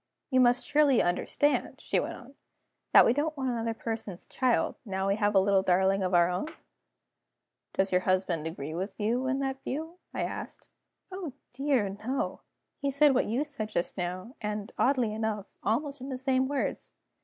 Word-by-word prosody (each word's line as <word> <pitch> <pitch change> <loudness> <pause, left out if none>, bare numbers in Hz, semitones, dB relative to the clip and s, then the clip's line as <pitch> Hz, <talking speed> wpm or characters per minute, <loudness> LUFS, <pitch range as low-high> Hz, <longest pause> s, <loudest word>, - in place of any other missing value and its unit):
"You 260 - +4
must 245 0 +4
surely 290 -4 +4
understand," 185 +11 +1
she - - 0
went - - -3
on, 265 +1 -13 0.6
"that - - +8
we 230 - +4
don't 305 +3 -1
want 265 -2 -1
another 230 -1 -2
person's 220 -5 -5
child, 255 -2 +1
now 190 -3 -2
we 195 - +2
have 205 -1 +1
a - - +8
little 195 0 +3
darling 190 +1 +3
of 185 -1 +1
our 170 0 +6
own?" 180 +9 -2 1.3
"Does 190 0 +1
your 180 0 +3
husband 185 -4 0
agree 155 -2 -5
with 190 +6 -4
you 240 +5 0
in 265 +1 +1
that 270 0 -2
view?" 320 +6 -5
I - - -2
asked. - - -6 0.4
"Oh 365 -7 -5 0.2
dear, 265 -4 +1
no! 220 +7 -3 0.4
He 280 - 0
said 280 +1 +5
what 260 - +2
you 240 +7 0
said 275 -8 -3
just 175 - -2
now, 185 +5 -4
and 210 0 -3
(oddly 250 -5 +2
enough) 215 -2 -2 0.2
almost 280 +6 -1
in 265 - -6
the 260 - -3
same 260 0 +1
words. 280 -1 -3
230 Hz, 180 wpm, -29 LUFS, 195-270 Hz, 1.3 s, that